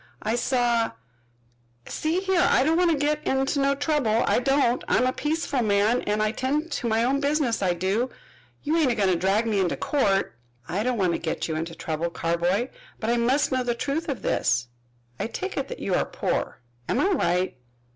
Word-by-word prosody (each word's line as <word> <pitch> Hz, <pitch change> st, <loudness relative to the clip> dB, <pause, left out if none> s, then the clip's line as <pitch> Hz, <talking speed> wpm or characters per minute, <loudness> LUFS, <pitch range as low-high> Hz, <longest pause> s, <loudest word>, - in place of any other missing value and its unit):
"I 215 Hz, -, 0 dB
saw 240 Hz, -2 st, +1 dB, 0.9 s
See 325 Hz, +4 st, -1 dB
here, 380 Hz, -2 st, +2 dB
I -, -, +4 dB
don't 315 Hz, +3 st, +2 dB
want 350 Hz, 0 st, +3 dB
to 320 Hz, -, +2 dB
get 300 Hz, +1 st, 0 dB
in 265 Hz, 0 st, +1 dB, 0.2 s
no 275 Hz, 0 st, +2 dB
trouble, 280 Hz, -6 st, +1 dB
I -, -, +2 dB
don't. 255 Hz, -1 st, +2 dB
I'm 255 Hz, -, +3 dB
a 255 Hz, -, +1 dB
peaceful 295 Hz, -3 st, -1 dB
man, 215 Hz, +2 st, +2 dB
an' 210 Hz, +1 st, -1 dB
I 215 Hz, 0 st, +1 dB
tend 295 Hz, +7 st, -2 dB
to 245 Hz, -, -2 dB
my 225 Hz, 0 st, +2 dB
own 270 Hz, +3 st, +1 dB
business, 285 Hz, -5 st, 0 dB
I 180 Hz, -2 st, +1 dB
do. 195 Hz, +8 st, 0 dB, 0.5 s
You 315 Hz, +3 st, +1 dB
ain't 310 Hz, -5 st, +3 dB
a -, -, 0 dB
goin' 200 Hz, -3 st, +2 dB
to 185 Hz, -, +3 dB
drag 195 Hz, +6 st, +1 dB
me 215 Hz, -3 st, +1 dB
into 185 Hz, -2 st, 0 dB
court." 200 Hz, -, +1 dB, 0.3 s
"I 195 Hz, -, -1 dB
don't 250 Hz, +1 st, 0 dB
want 185 Hz, -4 st, +2 dB
to -, -, -2 dB
get 160 Hz, -, -3 dB
you 160 Hz, -, -2 dB
into 165 Hz, +1 st, -4 dB
trouble, 165 Hz, +1 st, -3 dB
Carboy 175 Hz, +8 st, 0 dB, 0.3 s
but 225 Hz, +1 st, -1 dB
I 240 Hz, -, +2 dB
must 255 Hz, +5 st, +2 dB
know 255 Hz, -1 st, +1 dB
the 240 Hz, -1 st, -1 dB
truth 305 Hz, +7 st, -2 dB
of 275 Hz, -, -4 dB
this. 125 Hz, 0 st, +1 dB, 0.5 s
I -, -, -1 dB
take -, -, -5 dB
it -, -, -2 dB
that -, -, -6 dB
you -, -, -3 dB
are -, -, +3 dB
poor. -, -, -3 dB, 0.3 s
Am -, -, +1 dB
I 385 Hz, -, +3 dB
right?" 180 Hz, -, 0 dB
240 Hz, 210 wpm, -25 LUFS, 200-280 Hz, 0.9 s, I